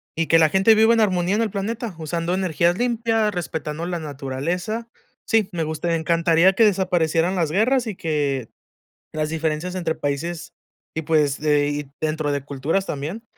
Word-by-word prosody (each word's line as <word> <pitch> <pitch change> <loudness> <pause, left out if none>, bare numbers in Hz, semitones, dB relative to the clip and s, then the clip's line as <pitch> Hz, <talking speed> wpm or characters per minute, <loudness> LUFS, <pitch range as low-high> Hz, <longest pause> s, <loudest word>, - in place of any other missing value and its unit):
Y 165 0 -1
que 165 - +5
la 160 -1 +5
gente 195 +5 +5
viva 220 +2 +5
en 230 - +2
armonía 185 -2 +1
en 220 - +1
el 225 - 0
planeta, 215 +1 -4
usando 165 +2 -2
energías 175 -1 +1
limpias, 225 -3 +1
respetando 160 -2 -4
la 175 -1 -3
naturaleza. 160 - -4 0.4
Sí, 220 -3 +2
me 165 -2 -1
gustaría 160 +2 -1
encantaría 170 +2 +3
que 225 +4 +4
desaparecieran 180 -3 +1
las 165 -4 0
guerras 235 +7 +2
y 210 - -4
que, 145 -7 -2 0.6
las 155 0 -1
diferencias 160 +2 -2
entre 170 -3 -1
países 155 +4 -3 0.4
y 160 - -3
pues 150 -3 +1
de 150 -1 +2
y 145 -1 -4
dentro 155 -1 -1
de 140 -1 -2
culturas 145 +7 -1
también 155 +10 -5
170 Hz, 170 wpm, -22 LUFS, 155-195 Hz, 0.6 s, que